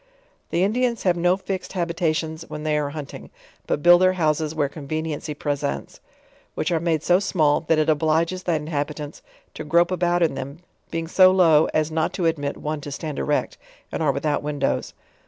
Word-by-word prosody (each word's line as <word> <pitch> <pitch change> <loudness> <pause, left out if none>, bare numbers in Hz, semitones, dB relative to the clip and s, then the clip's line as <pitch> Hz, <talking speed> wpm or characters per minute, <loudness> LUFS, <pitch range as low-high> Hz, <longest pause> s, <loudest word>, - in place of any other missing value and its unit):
The 175 - +1
Indians 235 +3 0
have 180 -2 +3
no 175 +2 +2
fixed 190 -1 -5
habitations 165 -3 -1
when 150 - -6
they 155 -1 0
are 150 -1 0
hun 150 0 -6
ting; - - -11 0.4
but 145 - -1
build 175 +1 +7
their 185 0 +4
houses 155 -2 0
where 145 -2 +1
conveniency 155 +1 -4
presents; 140 - -3 0.6
which - - -1
are 165 - +2
made 160 -2 0
so 180 +1 +4
small, 160 -7 +2
that 160 - +3
it 155 - +2
oblges 160 +4 +1
the 175 - +1
inhobitants 150 -1 -4 0.3
to - - -6
grope 170 +4 +3
about 175 -1 +1
in 160 - +2
them, 135 +2 -6 0.3
being 165 0 -3
so 185 +2 +6
low 165 -5 +5
as 155 0 0
not 160 0 0
to 180 - -2
admit 145 -3 -1
one 150 0 -4
to 145 - -7
stand 150 +1 -5
erect, 150 - -1 0.3
and - - -3
are 150 -3 +3
without 145 +2 -1
windows. 145 -1 -2
160 Hz, 190 wpm, -23 LUFS, 150-175 Hz, 0.6 s, build